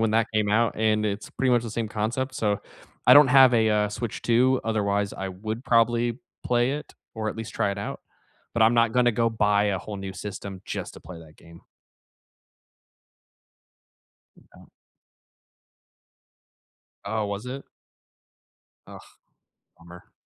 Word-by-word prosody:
when 110 -1 +1
that 115 0 +2
came 105 -1 +1
out, 115 +2 +1
and 110 -1 +1
it's 100 -1 -3
pretty 135 -1 0
much 120 -2 +3
the 115 - -6
same 110 0 -3
concept, 120 +5 -3
so 105 -4 -1 0.5
I - - +8
don't 145 -1 +8
have 130 -1 +7
a, 110 -2 +3
uh, 105 -1 +2
Switch 115 +1 -5
2, 125 +2 +3
otherwise, 100 -2 0
I 95 - -5
would 110 +6 -6
probably 120 0 +2 0.3
play 120 +1 +2
it 150 +1 -7 0.2
or 110 -1 -3
at - - -5
least 115 -1 -7
try 105 -3 0
it 100 - -5
out, 100 - -5 0.5
but 115 - +2
I'm 110 +2 +5
not 115 -1 +3
gonna 125 -1 +3
go 115 +1 +1
buy 105 -2 +2
a 100 -2 0
whole 105 +2 -7
new 95 -1 -6
system 95 -1 -7
just - - -6
to - - -12
play 85 +2 -11
that 80 -1 -16
game. 85 +2 -16 2.7
Yeah. - - -19 2.4
Oh, 105 +1 -2
was 100 +3 -5
it? 135 +2 -6 1.2
Ugh. - - -14 0.6
Bummer. 85 +1 -15
110 Hz, 155 wpm, -25 LUFS, 100-120 Hz, 2.7 s, I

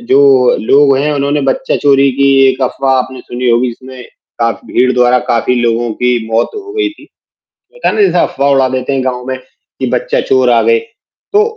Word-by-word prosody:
जो 140 - +3 0.4
लोग 140 +3 +4
हैं, 150 +2 0
उन्होंने 145 +1 -1
बच्चा - - -1
चोरी 140 -1 +3
की 140 +2 +1 0.2
एक 130 +1 -1
अफवाह 135 +1 0
आपने 130 0 -4
सुनी 125 +1 -4
होगी, 120 +2 +1
जिसमें 130 +2 -10 0.4
काफ़ 115 -2 -1
भीड़ 125 +1 +1
द्वारा 125 0 +3
काफ़ी 115 +2 0
लोगों 120 0 0
की 125 0 +2
मौत 115 +1 0
हो 405 -1 -8
गयी 415 -4 -1
थी, 310 - -17 0.7
पता - - -3
है - - -3
ना, 215 - +1
जैसे 180 -3 +2
अफवाह 140 -2 0
उड़ा 135 -1 +2
देते 130 +1 -3
हैं 135 -1 -1
गाँव 125 -1 -3
में, 130 0 -3 0.4
कि - - -2
बच्चा - - -1
चोर 130 -1 +1
आ 120 -1 +3
गए। 115 +1 +2 0.5
तो 420 +1 +4
130 Hz, 200 wpm, -12 LUFS, 125-140 Hz, 0.7 s, लोग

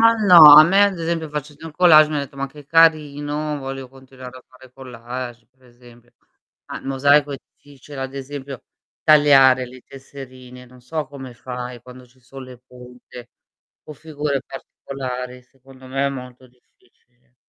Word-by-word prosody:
Ma 230 0 +6 0.2
no. 175 -2 +8 0.2
A 155 - +6
me 195 +4 +1
ad 200 -3 0
esempio 165 -1 -4
facendo 150 +1 -8
il 160 - -11
collage 155 -3 +5
mi 155 - -4
ha 145 - -1
detto: 140 0 -10
"Ma 140 0 -4
che 145 +1 -16
carino, 150 -2 0
voglio 135 -1 -8
continuare 130 -1 -14
a 125 - -21
fare 130 0 -20
collage." 120 -1 -9
Per 130 0 -36
esempio. 120 -1 -21 0.5
Mah, - - -8
il - - -14
mosaico 140 +2 +1
e 135 - -7
ti 145 - -27
dice 140 +1 -14
ad 135 0 -7
esempio: 135 -1 -9 0.4
"Tagliare 135 -4 +4
le 125 0 -15
tesserine." 130 -2 -14
Non 125 0 -19
so 150 +4 -6
come 130 -2 -11
fai 125 -1 -9
quando 125 0 -15
ci 125 +1 -29
son 130 +2 -13
le 125 -1 -14
punte 125 -1 -15 0.5
o 150 - -11
figure 145 -2 -5
particolari, 125 -2 -9
secondo 130 +1 -20
me 135 +2 -2
è - - 0
molto 125 -1 -10
difficile. 125 - -37
135 Hz, 170 wpm, -19 LUFS, 125-145 Hz, 0.5 s, no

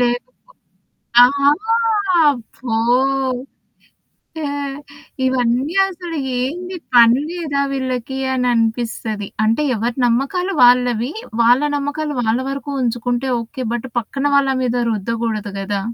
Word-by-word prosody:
లేదు. 245 0 +1 1.0
ఆ! - - +10 1.3
ఫో 240 -4 -4 0.5
ఓకే, 255 +1 -7 1.6
ఇవన్నీ 255 +5 0
అసలు 350 -3 -6 0.2
ఏంది 355 +8 -4 0.2
పని 235 +1 +6
లేదా 315 -5 -2
వీళ్ళకి 260 -1 -3 0.2
అని 250 -1 0
అనిపిస్తది. 225 -2 -2 0.2
అంటే 225 +7 +2
ఎవరి 230 +3 -2
నమ్మకాలు 280 +11 0
వాళ్ళవి. 245 +1 +3 0.3
వాళ్ళ 245 +4 +4
నమ్మకాలు 290 +1 -3
వాళ్ళ 225 +1 +1
వరకు 275 +1 -5
ఉంచుకుంటే 245 +2 -1
ఓకే. 250 +3 -6
బట్ 240 +2 -4
పక్కన 270 +5 -5
వాళ్ళ 275 -1 +3
మీద 245 -1 0 0.2
రుద్దగూడదు 215 -1 -3
గదా! 200 0 -2
245 Hz, 105 wpm, -19 LUFS, 230-275 Hz, 1.6 s, ఆ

